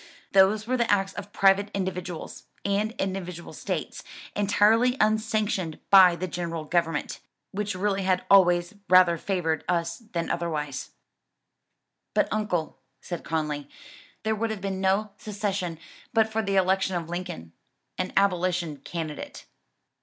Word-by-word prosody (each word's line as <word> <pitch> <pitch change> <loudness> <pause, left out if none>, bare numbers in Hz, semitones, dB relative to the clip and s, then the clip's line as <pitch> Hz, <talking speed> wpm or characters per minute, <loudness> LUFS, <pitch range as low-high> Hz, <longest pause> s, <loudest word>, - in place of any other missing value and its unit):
"Those 195 +2 +4
were 255 +2 0
the 235 -2 +1
acts 195 -1 +1
of 205 - -8
private 195 +1 +4
individuals, 180 -3 -4 0.2
and 205 +2 0
individual 185 -5 -4
states, - - -4 0.3
entirely 220 +5 +3
unsanctioned 215 -6 +1
by 185 -3 +8
the 185 +2 -4
general 170 -2 -4
government, 165 -1 -1 0.3
which 205 0 -3
really 195 +1 0
had 185 -1 +1
always 175 -2 +5 0.2
rather 185 -2 +7
favored 165 -5 -1
us 170 -1 0
than 200 -8 -4
otherwise." 150 -5 -3 1.3
"But - - +3
uncle," 185 -9 -2 0.2
said 175 -2 -6
Conly, 150 -3 -2 0.5
"there 220 +1 +1
would 225 +1 -1
have 220 -2 -4
been 190 0 -3
no 195 +2 +1
secession 200 -5 -3 0.4
but 220 -1 +5
for 220 0 -1
the 200 -2 -1
election 190 0 +2
of 170 -2 -3
Lincoln, 165 - -6 0.5
an 185 - -1
abolition 180 -5 +1
candidate." 155 -1 -6
190 Hz, 130 wpm, -26 LUFS, 170-205 Hz, 1.3 s, by